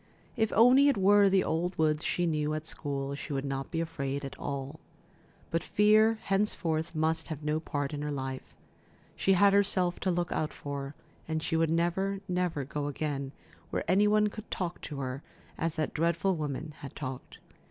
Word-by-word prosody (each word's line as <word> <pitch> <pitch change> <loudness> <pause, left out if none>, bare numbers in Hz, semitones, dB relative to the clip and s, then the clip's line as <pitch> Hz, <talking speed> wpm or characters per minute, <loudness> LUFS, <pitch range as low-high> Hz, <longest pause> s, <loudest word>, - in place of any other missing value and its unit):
If 220 -1 +1
only 255 +5 +7
it 280 - +3
were 200 +1 +6
the 190 -1 +3
old 175 +3 -1
woods 155 -1 +2
she 175 - 0
knew 155 -2 0
at 155 - -4
the - - -11
school, 140 -2 -3
she 145 +1 -5
would 135 0 -2
not 135 -1 -3
be 165 - -2
afraid 140 -4 -3
at 135 - -7
all. 140 +2 -4 0.7
But 165 - 0
fear 215 +2 +4
henceforth 170 -5 0
must 160 +1 0
have 155 -2 -6
no 150 +1 0
part 145 -3 -3
in 145 - -3
her 150 - -2
life. 130 -2 -5 0.6
She 195 - +3
had 200 +2 +5
herself 190 -3 +2
to 190 - -1
look 175 -1 0
out 155 - -1
for, 140 0 -6 0.3
and 160 0 -2
she - - -1
would 165 0 +2
never, 175 +4 0
never 180 -5 -1
go 145 +2 -3
again 140 -2 -3 0.4
where - - -2
any 200 +3 +4
one 210 0 +4
could 215 +1 -10
talk 175 -2 -3
to 145 -3 -5
her 130 +1 -4 0.3
as 165 -1 -1
that 155 -3 -1
dreadful 170 +3 +1
woman 150 0 -4
had 140 - -9
talked. 130 -3 -6
160 Hz, 190 wpm, -30 LUFS, 145-185 Hz, 0.7 s, only